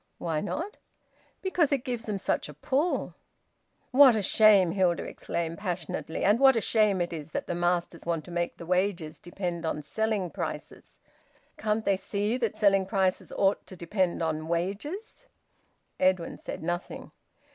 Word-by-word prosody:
"Why 160 Hz, -3 st, -2 dB
not?" 335 Hz, -, -4 dB, 0.7 s
"Because 360 Hz, -6 st, +2 dB
it 275 Hz, -3 st, +1 dB
gives 240 Hz, -3 st, -4 dB
them 210 Hz, -2 st, -1 dB
such 185 Hz, -, -1 dB
a 150 Hz, -, -10 dB
pull." 280 Hz, -, 0 dB, 0.8 s
"What 265 Hz, -2 st, +8 dB
a 215 Hz, -, 0 dB
shame!" 200 Hz, -3 st, +6 dB
Hilda 180 Hz, -2 st, +1 dB
exclaimed 165 Hz, 0 st, -4 dB
passionately. 175 Hz, -4 st, -3 dB
"And 205 Hz, +4 st, +4 dB
what 270 Hz, -1 st, +7 dB
a -, -, +3 dB
shame 210 Hz, -3 st, +2 dB
it 175 Hz, 0 st, -2 dB
is 155 Hz, -1 st, -7 dB
that -, -, -2 dB
the -, -, -3 dB
masters 175 Hz, -1 st, -1 dB
want 165 Hz, -2 st, -1 dB
to 175 Hz, -, -10 dB
make 175 Hz, 0 st, -2 dB
the 170 Hz, -, -9 dB
wages 180 Hz, -3 st, -1 dB
depend 175 Hz, -1 st, -4 dB
on 150 Hz, -2 st, -2 dB
selling 210 Hz, +2 st, -1 dB
prices! -, -, -6 dB, 0.6 s
Can't 215 Hz, 0 st, -1 dB
they 195 Hz, -, +3 dB
see 205 Hz, +4 st, -1 dB
that 230 Hz, -4 st, -2 dB
selling 195 Hz, -2 st, +3 dB
prices 190 Hz, -2 st, 0 dB
ought 195 Hz, 0 st, +1 dB
to 185 Hz, -, -10 dB
depend 175 Hz, 0 st, -1 dB
on 155 Hz, -1 st, -2 dB
wages?" 200 Hz, -, -4 dB, 0.7 s
Edwin 185 Hz, -2 st, +1 dB
said -, -, -7 dB
nothing. 175 Hz, +1 st, -4 dB
190 Hz, 160 wpm, -28 LUFS, 170-215 Hz, 0.8 s, What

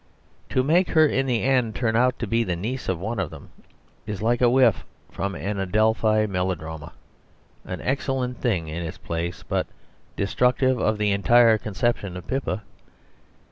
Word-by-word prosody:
To 130 Hz, -, +1 dB
make 170 Hz, +7 st, +3 dB
her 160 Hz, -2 st, +5 dB
in 135 Hz, -2 st, 0 dB
the 120 Hz, -3 st, 0 dB
end 125 Hz, -4 st, +1 dB
turn 110 Hz, -3 st, 0 dB
out 125 Hz, +2 st, +3 dB
to -, -, -3 dB
be 115 Hz, +3 st, +1 dB
the 90 Hz, -5 st, -2 dB
niece 115 Hz, +9 st, -4 dB
of 90 Hz, -3 st, -1 dB
one 110 Hz, +4 st, -3 dB
of 95 Hz, -6 st, -1 dB
them, -, -, -12 dB, 0.6 s
is 105 Hz, -3 st, -4 dB
like 120 Hz, +3 st, +1 dB
a 120 Hz, -, +5 dB
whiff 130 Hz, +1 st, +4 dB, 0.3 s
from 100 Hz, 0 st, -3 dB
an 100 Hz, +1 st, -3 dB
Adelphi 110 Hz, +2 st, +2 dB
melodrama, 90 Hz, -5 st, -4 dB, 0.7 s
an -, -, -6 dB
excellent 130 Hz, -2 st, -2 dB
thing 95 Hz, -10 st, 0 dB
in 80 Hz, +2 st, -4 dB
its 80 Hz, -, -6 dB
place, 85 Hz, +1 st, -4 dB
but -, -, -1 dB, 0.5 s
destructive 125 Hz, +5 st, +1 dB
of 110 Hz, 0 st, +1 dB
the 105 Hz, -1 st, +1 dB
entire 115 Hz, +3 st, +5 dB
conception 105 Hz, -3 st, -2 dB
of 90 Hz, -, -9 dB
Pippa. 120 Hz, -7 st, -2 dB
110 Hz, 170 wpm, -24 LUFS, 95-125 Hz, 0.7 s, her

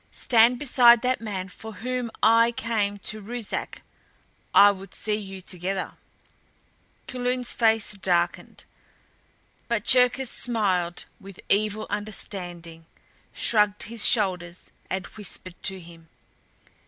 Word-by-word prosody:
Stand 235 Hz, +1 st, +3 dB
beside 240 Hz, -3 st, +5 dB
that 255 Hz, -1 st, 0 dB
man 195 Hz, -4 st, -4 dB
for 220 Hz, +4 st, -11 dB
whom 250 Hz, +1 st, -4 dB
I 230 Hz, +1 st, +5 dB
came 215 Hz, -3 st, -1 dB
to 215 Hz, +1 st, -3 dB
Ruszark. 230 Hz, +1 st, -5 dB, 0.7 s
I 205 Hz, 0 st, +7 dB
would 195 Hz, 0 st, -10 dB
see 215 Hz, -, -2 dB
you 195 Hz, -3 st, -6 dB
together!" 185 Hz, +1 st, -4 dB, 1.1 s
Kulun's 250 Hz, -1 st, -2 dB
face 225 Hz, -2 st, +2 dB
darkened. 175 Hz, -3 st, -2 dB, 1.0 s
But 235 Hz, -2 st, -2 dB
Cherkis 250 Hz, 0 st, +3 dB
smiled 190 Hz, -7 st, -1 dB
with 195 Hz, -2 st, -13 dB
evil 215 Hz, +1 st, 0 dB
understanding, 175 Hz, -6 st, -6 dB, 0.4 s
shrugged 210 Hz, -2 st, +2 dB
his 225 Hz, -1 st, -4 dB
shoulders 180 Hz, -5 st, +1 dB, 0.2 s
and 190 Hz, -1 st, -3 dB
whispered 185 Hz, -3 st, -7 dB
to 190 Hz, 0 st, -2 dB
him. 165 Hz, -2 st, -15 dB
210 Hz, 110 wpm, -25 LUFS, 185-235 Hz, 1.1 s, I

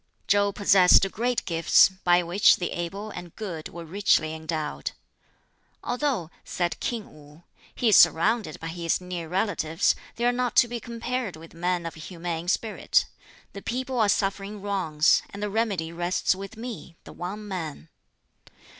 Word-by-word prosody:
Chow 200 Hz, 0 st, +3 dB
possessed 195 Hz, -2 st, +5 dB
great 245 Hz, +1 st, -1 dB
gifts, 165 Hz, -1 st, +5 dB
by 180 Hz, -2 st, +2 dB
which 175 Hz, +4 st, +5 dB
the 175 Hz, -, -3 dB
able 195 Hz, +5 st, -5 dB
and 175 Hz, -3 st, -9 dB
good 175 Hz, -8 st, -6 dB
were 170 Hz, 0 st, -9 dB
richly 165 Hz, -3 st, +2 dB
endowed. 160 Hz, -1 st, -4 dB, 0.9 s
"Although," 245 Hz, -, -1 dB
said 175 Hz, -1 st, -2 dB
King 230 Hz, -3 st, -4 dB
Wu, 150 Hz, +2 st, -17 dB, 0.3 s
"he 240 Hz, -, +2 dB
is 210 Hz, -, +7 dB
surrounded 195 Hz, 0 st, +4 dB
by 165 Hz, -, -5 dB
his 170 Hz, 0 st, -1 dB
near 180 Hz, -3 st, -6 dB
relatives, 175 Hz, -4 st, +1 dB, 0.2 s
they 235 Hz, -, -1 dB
are 245 Hz, -, +4 dB
not 245 Hz, 0 st, -1 dB
to 240 Hz, -, +6 dB
be 240 Hz, 0 st, -4 dB
compared 235 Hz, -2 st, -4 dB
with 160 Hz, +1 st, -13 dB
men 175 Hz, 0 st, -1 dB
of 165 Hz, -, -4 dB
humane 170 Hz, +1 st, -5 dB
spirit. 215 Hz, +4 st, +1 dB, 0.5 s
The 200 Hz, -, -8 dB
people 255 Hz, +3 st, -3 dB
are 215 Hz, -2 st, +3 dB
suffering 200 Hz, +1 st, -1 dB
wrongs, 185 Hz, -6 st, +2 dB
and 200 Hz, +1 st, -7 dB
the 210 Hz, -, -2 dB
remedy 200 Hz, -7 st, -1 dB
rests 175 Hz, +3 st, 0 dB
with 195 Hz, +3 st, -9 dB
me 225 Hz, -7 st, -7 dB
the -, -, -12 dB
one 205 Hz, +4 st, -6 dB
man." 160 Hz, -, -5 dB
185 Hz, 155 wpm, -26 LUFS, 165-215 Hz, 0.9 s, is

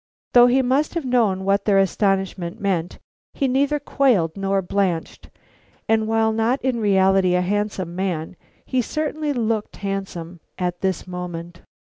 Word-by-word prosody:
Though 245 Hz, 0 st, +8 dB
he 260 Hz, +2 st, +3 dB
must 275 Hz, +6 st, +1 dB
have 335 Hz, -5 st, -2 dB
known 220 Hz, -7 st, +1 dB
what 200 Hz, 0 st, +1 dB
their 200 Hz, -2 st, +3 dB
astonishment 195 Hz, -2 st, 0 dB
meant, 180 Hz, -4 st, -1 dB, 0.4 s
he 275 Hz, -, +1 dB
neither 280 Hz, +3 st, +1 dB
quailed 230 Hz, -, +1 dB
nor 195 Hz, 0 st, 0 dB
blanched, 180 Hz, -3 st, -2 dB, 0.6 s
and 220 Hz, -1 st, +2 dB
while 220 Hz, 0 st, +2 dB
not 225 Hz, +4 st, +1 dB
in 255 Hz, -3 st, 0 dB
reality 190 Hz, -3 st, +3 dB
a 180 Hz, -, +2 dB
handsome 190 Hz, -2 st, -2 dB
man, 180 Hz, -3 st, -3 dB, 0.3 s
he 255 Hz, -, 0 dB
certainly 305 Hz, +3 st, -2 dB
looked 225 Hz, -4 st, -1 dB
handsome 190 Hz, -4 st, -5 dB, 0.2 s
at 180 Hz, -1 st, -3 dB
this 190 Hz, -3 st, -1 dB
moment. 175 Hz, -2 st, -7 dB
195 Hz, 145 wpm, -22 LUFS, 180-240 Hz, 0.6 s, Though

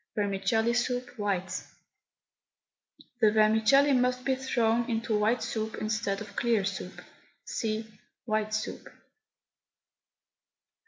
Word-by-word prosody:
VERMICELLI 205 Hz, +3 st, +1 dB
SOUP, 245 Hz, +1 st, -1 dB
WHITE. 190 Hz, -3 st, -1 dB, 1.6 s
The 215 Hz, -3 st, +5 dB
vermicelli 220 Hz, +6 st, +4 dB
must 250 Hz, 0 st, +1 dB
be 270 Hz, -, +2 dB
thrown 240 Hz, -3 st, +1 dB
into 225 Hz, -1 st, 0 dB
white 220 Hz, +4 st, +2 dB
soup 220 Hz, 0 st, -3 dB
instead 215 Hz, -2 st, -1 dB
of 205 Hz, -2 st, -9 dB
clear 230 Hz, -5 st, +1 dB
soup. 190 Hz, -2 st, -5 dB, 0.4 s
(See 220 Hz, 0 st, -2 dB, 0.4 s
WHITE 215 Hz, -1 st, -1 dB
SOUP.) 215 Hz, -, -4 dB
220 Hz, 100 wpm, -29 LUFS, 210-240 Hz, 1.6 s, The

